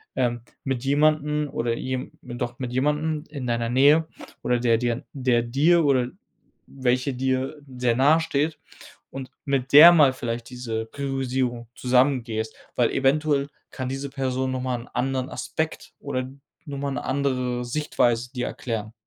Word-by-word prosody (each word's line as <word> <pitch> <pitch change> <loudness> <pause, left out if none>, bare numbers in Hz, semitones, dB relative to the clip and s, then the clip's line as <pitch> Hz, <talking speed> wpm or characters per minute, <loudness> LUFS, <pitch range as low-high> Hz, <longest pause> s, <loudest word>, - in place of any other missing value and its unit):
ähm, 120 -1 0 0.2
mit 135 -1 -2
jemandem 150 +1 +2
oder 115 0 -1
je 130 +1 -4
doch 120 0 -5
mit 125 -2 -4
jemandem 150 +3 0
in 140 -4 -6
deiner 115 0 0
Nähe 145 +5 +5 0.4
oder 125 0 +2
der 115 -2 +3
dir 120 +1 -1
der 125 -4 +1
dir 155 +8 +3
oder 130 -3 +2 0.6
welcher 130 0 0
dir 130 +3 -1 0.2
sehr 125 -2 +2
nahesteht 155 +1 +2 0.5
und 135 -1 -7
mit 140 -1 -1
der 160 +4 +11
mal 145 -5 +6
vielleicht 120 -2 -4
diese 115 -3 -4
Priorisierung 130 -3 -2
zusammen 125 0 +2
gehst, 110 -1 -4 0.2
weil 120 -2 +3
eventuell 140 +1 +1 0.2
kann 130 -2 -4
diese 135 +1 -4
Person 130 -1 -1
noch 130 -1 -2
mal 125 -1 -1
'n - - -13
anderen 130 0 -1
Aspekt - - -4
oder 130 0 -3 0.4
noch 140 -2 -6
mal 140 0 -2
'ne - - -4
andere 125 -3 -1
Sichtweise 120 -3 0
dir 125 -2 -3
erklären. 110 -3 -4
130 Hz, 150 wpm, -24 LUFS, 125-140 Hz, 0.6 s, der